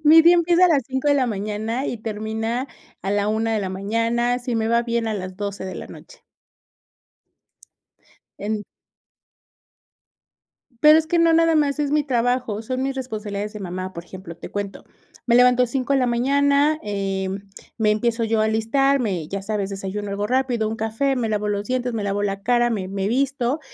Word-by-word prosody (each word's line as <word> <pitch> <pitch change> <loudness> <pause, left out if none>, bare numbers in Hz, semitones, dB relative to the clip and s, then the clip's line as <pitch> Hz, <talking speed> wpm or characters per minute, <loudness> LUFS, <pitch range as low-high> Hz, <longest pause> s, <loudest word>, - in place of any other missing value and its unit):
mi 320 +2 +8
día 340 +1 +7
empieza 345 +1 +4
a 360 - +6
las 285 -5 +3
5 265 +2 -1
de 285 - +5
la 265 -3 +2
mañana, 215 +4 -3
y 240 - -3
termina 220 +3 -3 0.4
a 195 - -2
la 205 0 +1
1 225 +1 0
de 215 - 0
la 190 - -3
mañana, 230 +5 0
si 245 -2 -3
me 220 0 0
va 235 0 +3
bien 235 -1 -1
a 220 - -1
las 185 -2 -6
12 200 -2 -4
de 185 - -5
la - - -7
noche. - - -14 2.2
En 210 0 -3 2.2
Pero, 305 +1 +8
es 315 - 0
que 340 +1 +2
no 335 0 +5
nada 330 0 +4
más 295 -1 +1
es 290 -1 0
mi 300 -1 +2
trabajo, 245 -4 0
son 255 +3 -3
mis 270 0 -2
responsabilidades 210 -5 -4
de 210 - -7
mamá, 185 0 -5
por 170 - -7
ejemplo, 180 -2 -10
te - - -9
cuento. 205 -1 -5 0.4
Me 235 - +4
levanto 250 0 +5
5 260 +3 -1
de 270 - +3
la 250 - +2
mañana, 280 +5 +2
eh, 195 -2 -2 0.5
me 215 -2 +3
empiezo 230 +2 0
yo 220 -1 +1
a - - +3
alistar, 265 +6 +2
me 185 -9 -2
ya 195 +3 -4
sabes, 200 -1 -2
desayuno 200 +1 -5
algo 205 +1 -2
rápido, 250 -3 +1
un 220 - -3
café, 225 +5 -1
me 230 -3 -1
lavo 210 0 -1
los 205 0 -2
dientes, 250 -1 -1
me 215 -2 -2
lavo 200 0 -1
la 195 -1 -2
cara, 240 +1 +3
me 200 -5 -2
me 195 0 -2
visto, 270 +3 0
225 Hz, 195 wpm, -22 LUFS, 205-265 Hz, 2.2 s, mi